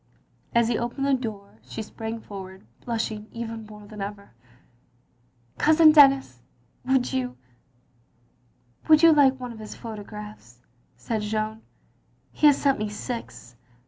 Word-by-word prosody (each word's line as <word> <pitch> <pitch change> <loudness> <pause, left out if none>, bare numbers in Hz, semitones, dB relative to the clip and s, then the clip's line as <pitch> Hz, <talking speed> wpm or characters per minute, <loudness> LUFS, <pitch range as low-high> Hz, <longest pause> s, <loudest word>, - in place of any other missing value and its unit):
As 235 -1 +4
he 235 - 0
opened 240 +4 -3
the 280 - +2
door 215 -6 -5
she 220 - -7
sprang 225 +1 -6
forward, 190 -2 -10 0.2
blushing 220 -2 -3
even 230 -2 -6
more 210 -1 -12
than 210 0 -9
ever. 200 0 -7 1.3
"Cousin 315 0 +6
Denis 275 - +5 0.2
— 125 - -26
^would 260 -1 +1
you 125 -1 -2 0.7
— 120 0 -38
wovHd 310 0 +6
you 330 -1 +8
like 270 -3 +4
one 250 -2 -6
of 220 - -12
his 215 -1 -8
photographs?" 210 - -9 0.4
said 220 - -3
Jeanne. 215 +1 -3 0.7
"He 300 - +4
has 290 - +6
sent 275 -4 +2
me 215 0 -2
six. 210 - -7
220 Hz, 145 wpm, -25 LUFS, 205-255 Hz, 1.3 s, you